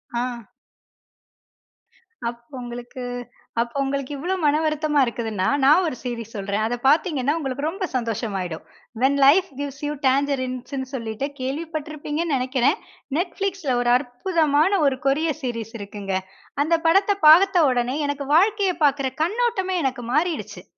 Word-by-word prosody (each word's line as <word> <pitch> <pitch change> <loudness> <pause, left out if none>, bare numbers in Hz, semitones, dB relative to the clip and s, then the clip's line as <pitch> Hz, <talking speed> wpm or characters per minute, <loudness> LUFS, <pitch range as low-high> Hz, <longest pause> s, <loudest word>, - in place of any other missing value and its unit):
ஆ. 240 -2 -3 1.8
அப்போ 235 +3 -13
உங்களுக்கு 245 +1 -8 0.6
அப்ப 235 0 -4
உங்களுக்கு 275 0 -3
இவ்வளவு 360 +6 -2
மனம் 300 +1 +3
வருத்தமா 305 -1 +1
இருக்குதுனா, 220 -5 -2 0.2
நான் 305 +7 +6
ஒரு 280 - -3
சீரிஸ் 230 -3 -5
சொல்றேன். 200 +1 -1
அத 240 +2 -1
பார்த்தீங்கனா, 295 -2 +2
உங்களுக்கு 275 -2 -4
ரொம்ப 370 +4 -2
சந்தோசமாகிடும். 205 -8 -3 0.4
வென் 275 +2 +3
லைஃப் 360 +7 +6
கிவ்ஸ் 280 -1 -5
யூ 295 - -1
டாங்கரின்ஸ்ன்னு 260 -1 -1
சொல்லிட்டு 230 +1 -3
கேள்விப்பட்டு 305 +4 -4
இருப்பீங்கன்னு 305 +1 -2
நினைக்கிறேன். 255 +2 +1 0.4
Netflixல 360 -5 -1
ஒரு 240 0 +2
அற்புதமான 300 +5 +1
ஒரு 270 -2 +2
கொரியன் 310 +2 +1
சீரிஸ் 230 -3 -4
இருக்குங்க. 200 -1 -5 0.5
அந்த 335 +3 +2
படத்தை 390 +4 +4
பார்த்த 355 +1 +7
உடனே, 250 +2 0
எனக்கு 285 -1 -3
வாழ்க்கையை 395 +1 +3
பார்க்கிற 275 -2 +3
கண்ணோட்டமே 390 -1 0
எனக்கு 260 -2 -2
மாறிடுச்சு. 325 +2 -1
275 Hz, 125 wpm, -23 LUFS, 245-320 Hz, 1.8 s, பார்த்த